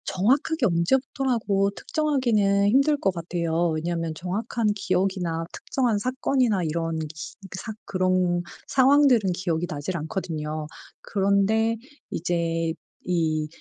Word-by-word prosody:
정확하게 265 - +1
언제부터라고 215 +2 +1
특정하기는 225 -11 +1
힘들 275 +6 +4
것 195 -8 0
같아요. 170 0 -1
왜냐하면 165 +1 -2
정확한 210 +7 -2
기억이나 180 -4 -1
특정한 245 -6 0
사건이나 250 -4 +1
이런 165 0 -1
기 155 - -3 0.5
사 220 +3 -5
그런 185 -1 +1 0.3
상황들은 260 -6 +4
기억이 175 -2 -1
나질 155 +5 -3
않거든요. 155 -3 -4 0.3
그런데 200 +3 +2 0.3
이제 165 -1 -1 0.3
이 160 -3 0
190 Hz, 280 characters per minute, -25 LUFS, 165-230 Hz, 0.5 s, 힘들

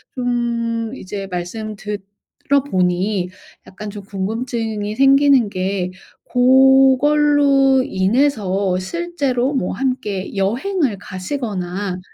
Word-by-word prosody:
좀 235 -2 -1
이제 195 -3 -6
말씀 210 +4 -5
들어 210 +7 -3
보니 180 0 0 0.4
약간 210 +2 -8
좀 205 -1 -8
궁금증이 215 +1 -3
생기는 275 -4 +5
게 185 -1 -2 0.4
고걸로 270 +1 +4
인해서 195 -3 +1
실제로 280 - -2
뭐 220 -9 -1
함께 210 -6 -3
여행을 250 - 0
가시거나 185 -3 -4
225 Hz, 195 characters per minute, -19 LUFS, 195-265 Hz, 0.4 s, 생기는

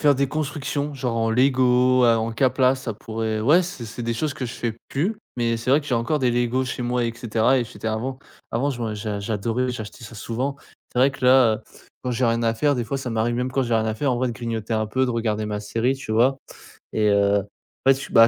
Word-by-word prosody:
faire 145 -2 +5
des 140 0 0
constructions, 145 0 -3
genre, 125 -3 -2
en 115 0 +1
Lego 130 0 +4
à 115 -1 +5
en 115 +1 -1
Kapla. 130 +1 +3
Ça 130 -4 -5
pourrait, 110 0 -3
ouais, 150 +11 +5
c'est 170 -9 -6
c'est 115 +2 -6
des 115 - -1
choses 150 +5 -1
que 130 - -4
je 115 - -6
fais 115 -2 -3
plus. 180 +11 -1 0.2
Mais, 115 -1 +1
c'est 115 +3 -2
vrai 145 +3 +5
que 145 - -12
j'ai 125 - +1
encore 115 +6 0
des 125 -2 +3
Lego 120 +2 +1
chez 125 0 -4
moi, 120 0 0
et 115 - -1
cetera. 115 +2 +2
Et 120 - 0
j'étais 110 - -6
avant 125 +4 -3 0.3
avant 130 +5 +1
je 125 -3 -5
m'en 110 -2 -2
j'a 105 -1 -3
j'adorais 115 +4 -1
j'achetais 115 0 -7
ça 110 - -10
souvent. 120 +6 -3 0.4
C'est 125 - +1
vrai 135 +2 +5
que 135 -2 -7
là, 125 -3 +6
heu, - - -5 0.5
quand 125 - -1
j'ai 125 +2 0
rien 115 0 +1
à 115 0 +2
faire, 145 +4 +2
des 120 - -1
fois, 125 +5 -3
ça 130 -2 -4
m'arrive, 115 +1 0
même 125 +1 -1
quand 135 0 +1
j'ai 120 -1 0
rien 110 - +2
à 110 -1 -1
faire, 130 +3 0
en - - 0
vrai, 130 +1 0
de - - -3
grignoter 115 -1 -4
un 110 -1 +1
peu, 130 +4 +1
de - - -1
regarder 110 -2 -1
ma 105 0 -2
série, 115 +5 0
tu 135 -5 -5
vois? 125 +5 +4 0.6
Et 105 -1 +2
heu, 100 0 +4
en 100 +6 -1
fait, 135 0 -2
bah, 115 0 +8
120 Hz, 265 wpm, -23 LUFS, 115-130 Hz, 0.6 s, bah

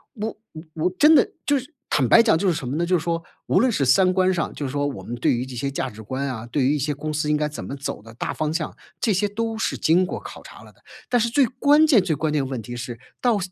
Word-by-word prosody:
我 215 0 -4 0.2
我 155 +1 -9
我 165 +3 0
真 305 +7 +7
的 - - +4
就 285 -1 +3
是 265 +6 -12 0.2
坦 130 -4 +2
白 230 - +7
讲 220 -7 +4
就 195 - 0
是 180 - +3
什 140 -6 -5
么 135 - -3
呢？ 170 +2 0
就 180 +1 +2
是 160 - -5
说 165 -1 -1 0.3
无 - - +3
论 255 -1 +3
是 140 -9 0
三 185 +8 +4
观 185 0 +3
上 170 -3 -2
就 145 - -4
说 145 +2 -1
我 140 - -6
们 120 - -5
对 120 - +1
于 125 +2 -2
这 130 -1 -9
些 140 +3 -2
价 135 -1 -2
值 110 0 -11
观 130 +5 -3
啊， 115 -3 -5
对 130 +3 -1
于 145 - +3
一 150 - -2
些 145 +2 -1
公 155 +2 -5
司 150 0 -1
应 150 - +3
该 150 - 0
怎 150 - -7
么 140 - -6
走 135 -6 -5
的 115 +1 -14
大 - - -4
方 155 0 -2
向， 160 -2 -3 0.2
这 220 - +1
些 205 +3 +1
都 225 +1 -3
是 - - -1
经 175 +4 +3
过 - - -5
考 - - -10
察 - - -13
了 - - -16
的。 - - -30 0.3
但 245 - +3
是 235 +1 +1
最 270 +2 +4
关 290 +6 +4
键， 245 -10 +6
最 175 -4 -1
关 150 +1 -1
键 140 -3 +1
问 130 -3 -4
题 120 +3 -8
是 120 -1 -6 0.2
到 240 -4 +3
155 Hz, 325 characters per minute, -23 LUFS, 135-205 Hz, 0.3 s, 真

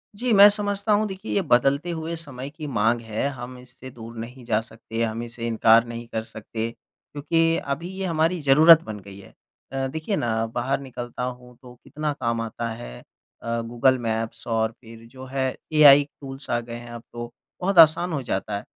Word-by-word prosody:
जी, 245 +4 -1
मैं 200 0 +9
समझता 205 0 +1
हूँ 215 +1 +2
देखिए 190 +2 -7
ये 200 - +2
बदलते 140 +1 +2
हुए 165 0 -4
समय 140 -4 -5
की 150 +1 -8
माँग 115 -2 +1
है 110 +3 -2
हम 125 -1 -8
इससे 130 +1 -12
दूर 115 0 -11
नहीं 125 +3 -8
जा 110 -2 +1
सकते, 115 0 -7
हम 115 0 -2
इसे 120 0 -7
इनकार 115 0 +4
नहीं 115 0 -7
कर 110 -1 -3
सकते, 110 +1 -5
क्योंकि 165 +6 -2
अभी 140 +6 -4
ये 195 - -3
हमारी 165 +1 +1
ज़रूरत 155 +4 +7
बन 105 -1 -7
गई 100 0 -12
है। 100 - -14 0.4
अ, 135 0 -1
देखिए 160 +9 -3
ना 115 -6 0
बाहर 125 +3 0
निकलता 125 -2 -7
हूँ 125 0 -7
तो 125 -2 -13
कितना 150 0 -3
काम 115 -4 -2
आता 115 +1 -4
है 110 - -8 0.4
अ, 115 0 -2
गूगल 120 +3 +2
मैप्स 115 -1 -3
और 110 -1 0
फिर 115 -1 -13
जो 130 0 -10
है, 130 0 -2 0.2
एआई 145 -2 +8 0.2
टूल्स 135 0 -8
आ 120 - +1
गए 115 0 -8
हैं 120 0 -9
अब 120 -1 -9
तो, 120 0 -6 0.3
बहुत 190 +1 0
आसान 165 +2 +6
हो 145 - -1
जाता 100 -2 -2
है। 100 - -8
125 Hz, 200 wpm, -24 LUFS, 115-155 Hz, 0.4 s, मैं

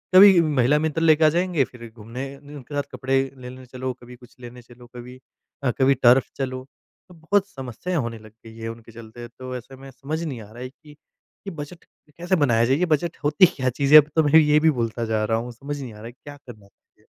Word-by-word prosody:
कभी 190 -2 +9
महिला 145 -3 +2
मित्र 160 +1 -2
लेके 160 -1 +4
आ 155 - +6
जाएँगे 175 -2 +1
फ़िर 120 -2 -12
घूमने 120 +5 -8
उनके 145 0 -11
साथ 145 - 0
कपड़े 130 +1 0 0.2
लेने 130 0 -10
चलो, 130 +1 -5
कभी 125 0 -14
कुछ 125 0 -19
लेने 120 0 -11
चलो 120 0 -17
कभी, 125 +1 -10 0.4
अ, 125 - +2
कभी 135 +1 +4
टर्फ 125 +2 +5
चलो 130 -1 -4 0.4
तो - - -14
बहुत 195 +5 0
समस्याएँ 140 - -5
होने 115 -1 -6
लग 110 0 -15
गई 110 0 -12
हैं 115 0 -6
उनके 115 0 -11
चलते। 115 +1 -11
तो 130 +1 -9
ऐसे 130 +2 -12
में 135 +1 -12
समझ 155 +5 -5
नहीं 135 -8 -5
आ 105 0 -14
रहा 120 +2 -9
है 130 - -6
कि 150 +2 -19 0.5
ये 195 - -3
बजट 150 +3 -9 0.3
कैसे 175 +2 0
बनाया 120 -8 +2
जाए 130 - +2
ये 180 - +1
बजट 165 0 -1
होती 150 +5 +5
क्या 130 -2 0
चीज़ 140 +4 -1
है? 155 - +12
अब 150 - -14
तो 160 - +4
मैं 155 +2 +6
ये 150 0 +4
भी 160 - +3
भूलता 115 -2 -3
जा 110 -1 -1
रहा 115 +1 0
हूँ 120 +2 -5
समझ 140 +4 -7
नहीं 120 -5 -8
आ - - -14
रहा 105 - -11
है 120 - -9
क्या 145 +3 -13
करना 105 -5 -13
चाहिए? - - -35
130 Hz, 235 wpm, -23 LUFS, 120-150 Hz, 0.5 s, है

